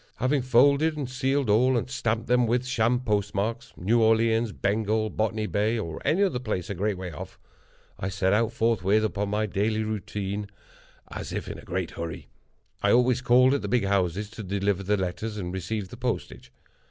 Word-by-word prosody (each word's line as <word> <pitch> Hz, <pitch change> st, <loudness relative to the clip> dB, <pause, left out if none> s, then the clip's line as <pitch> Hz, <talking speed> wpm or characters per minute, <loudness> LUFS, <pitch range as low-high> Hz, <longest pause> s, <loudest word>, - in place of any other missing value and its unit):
Having 135 Hz, +2 st, +1 dB
folded 140 Hz, +5 st, +4 dB
and 140 Hz, -4 st, -3 dB
sealed 135 Hz, +1 st, 0 dB
all, 120 Hz, +5 st, +4 dB
and 115 Hz, -, -2 dB
stamped 115 Hz, -3 st, -1 dB
them 125 Hz, 0 st, +3 dB
with 120 Hz, +2 st, +1 dB
sham 125 Hz, -1 st, +1 dB
postmarks—New 105 Hz, 0 st, -1 dB
Orleans, 115 Hz, 0 st, +3 dB
Bengal, 110 Hz, +2 st, 0 dB
Botany 110 Hz, 0 st, -1 dB
Bay, 105 Hz, +3 st, 0 dB
or 80 Hz, -7 st, -5 dB
any 185 Hz, +6 st, +2 dB
other 160 Hz, -11 st, 0 dB
place 105 Hz, -7 st, -3 dB
a -, -, -1 dB
great 100 Hz, +1 st, -1 dB
way 90 Hz, -1 st, -6 dB
off—I 80 Hz, +4 st, -10 dB
set 95 Hz, 0 st, +1 dB
out, 115 Hz, +1 st, +2 dB
forthwith, 110 Hz, -3 st, +2 dB
upon 105 Hz, -1 st, -1 dB
my 105 Hz, +1 st, 0 dB
daily 110 Hz, +2 st, 0 dB
route, 110 Hz, -2 st, -5 dB, 1.0 s
as -, -, -6 dB
if -, -, -4 dB
in -, -, -4 dB
a -, -, -10 dB
very -, -, -17 dB
great 90 Hz, -1 st, -3 dB
hurry. 85 Hz, -2 st, -6 dB, 0.5 s
I 100 Hz, -, +3 dB
always 125 Hz, +1 st, +3 dB
called 125 Hz, +1 st, +5 dB
at 140 Hz, -, 0 dB
the -, -, -4 dB
big 120 Hz, -5 st, +1 dB
houses 100 Hz, +1 st, 0 dB
to 115 Hz, -, -8 dB
deliver 100 Hz, 0 st, -1 dB
the 105 Hz, +2 st, +1 dB
letters, 95 Hz, +4 st, -3 dB
and 90 Hz, -3 st, -4 dB
receive 95 Hz, +1 st, -3 dB
the 120 Hz, -, -10 dB
postage. 125 Hz, -1 st, -4 dB
110 Hz, 185 wpm, -26 LUFS, 100-120 Hz, 1.0 s, called